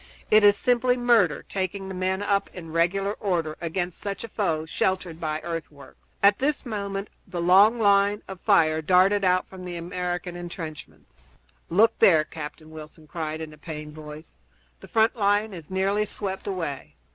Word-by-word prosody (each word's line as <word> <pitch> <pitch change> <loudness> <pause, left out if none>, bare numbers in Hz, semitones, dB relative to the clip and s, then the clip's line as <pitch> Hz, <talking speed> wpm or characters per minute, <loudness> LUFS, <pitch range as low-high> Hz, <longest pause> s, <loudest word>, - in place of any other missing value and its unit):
It 215 0 +6
is 205 0 +6
simply 250 +1 +2
murder, 235 -10 +3
taking 190 0 -3
the 190 - -6
men 185 +2 -1
up 200 -1 0
in 165 -3 -8
regular 190 +5 +1
order 170 -7 -1
against 175 +1 -3
such 200 -2 -5
a 230 - -7
foe 165 -8 -1
sheltered 175 0 -2
by 155 -1 -3
earthworks." 155 -4 -8
At 200 +1 +5
this 290 +2 -1
moment 200 -3 -4 0.2
the 180 -2 -5
long 195 +7 +5
line 200 0 +3
of 190 -2 -9
fire 160 -7 +3
darted 185 +5 +4
out 185 -1 +2
from 190 -1 -11
the 175 -1 -5
American 175 +1 -4
intrenchments. 160 - -9 0.5
"Look 220 +7 +3
there!" 160 -4 +6
Captain 155 0 -9
Wilson 155 0 -11
cried 155 0 -5
in 155 -1 -7
a 150 - -16
pained 150 -2 -7
voice. 150 - -11 0.4
"The - - -13
front 225 +1 +2
line 205 0 +1
is 165 -4 -10
nearly 195 +3 0
swept 195 -2 -4
away! 155 - -4
185 Hz, 170 wpm, -25 LUFS, 160-200 Hz, 0.5 s, It